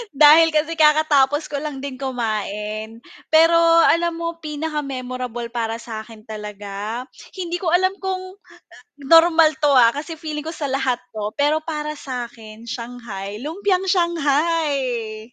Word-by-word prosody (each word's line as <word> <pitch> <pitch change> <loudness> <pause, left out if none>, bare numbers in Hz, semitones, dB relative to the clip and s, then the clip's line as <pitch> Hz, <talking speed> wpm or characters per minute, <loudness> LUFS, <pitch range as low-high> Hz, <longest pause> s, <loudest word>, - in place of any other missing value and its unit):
Dahil 305 +3 +8
kasi 320 +2 0
kakatapos 300 -1 +3
ko 285 - -2
lang 280 -2 -6
din 265 -2 -6
kumain, 220 -3 -4 0.2
pero 330 +1 +5 0.2
alam 340 0 +2
mo 335 0 -5
pinaka-memorable 255 -6 -5
para 225 -2 -2
sa'kin 225 -1 -9
talaga, 210 +1 -6 0.3
hindi 350 -2 -4
ko 360 - -4
alam 375 +1 +3
kung, 375 0 -5
ah, - - -18 0.5
normal 325 +2 +5
'to, 295 -2 +2
ah, 240 -1 +5
kasi 310 +3 -5
feeling 305 -2 -5
ko 320 - -5
sa 295 -4 -4
lahat 265 -2 0
'to, 210 -1 -5
pero 305 +2 +2
para 300 -1 -4
sa'kin 235 -4 -8
shanghai, 230 -4 -7
lumpiang 375 +5 -1
shanghai. 285 - 0
280 Hz, 135 wpm, -21 LUFS, 230-320 Hz, 0.5 s, Dahil